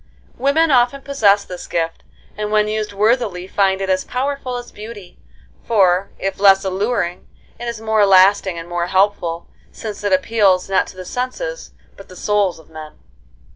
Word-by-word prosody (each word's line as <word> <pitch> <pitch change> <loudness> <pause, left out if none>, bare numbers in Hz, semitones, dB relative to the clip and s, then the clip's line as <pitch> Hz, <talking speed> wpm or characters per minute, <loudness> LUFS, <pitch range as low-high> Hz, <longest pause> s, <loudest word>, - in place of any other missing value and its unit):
Women 295 +5 +2
often 250 +2 +2
possess 205 -8 +2
this 180 -1 -8
gift, 165 -1 -2 0.3
and 210 0 -4
when 210 0 +3
used 215 0 -2
worthily 205 -3 0
find 190 0 +1
it 195 - -2
as 185 0 +1
powerful 260 -1 -3
as 245 0 -9
beauty; 210 -3 -11 0.4
for, 195 -3 +2
if 195 0 -4
less 195 -1 +5
alluring, 190 -2 -2 0.3
it 240 - -6
is 235 -2 -4
more 220 -2 +2
lasting 190 -1 +4
and 165 0 -7
more 175 0 -2
helpful, 185 -3 0 0.3
since 210 -2 -7
it 205 - 0
appeals, 190 -1 +2
not 195 -1 +1
to - - -13
the 185 - -8
senses, - - -5 0.2
but 195 - -13
the 185 - -12
souls 205 -1 0
of 160 - -17
men. 155 -1 -10
200 Hz, 170 wpm, -19 LUFS, 185-230 Hz, 0.4 s, less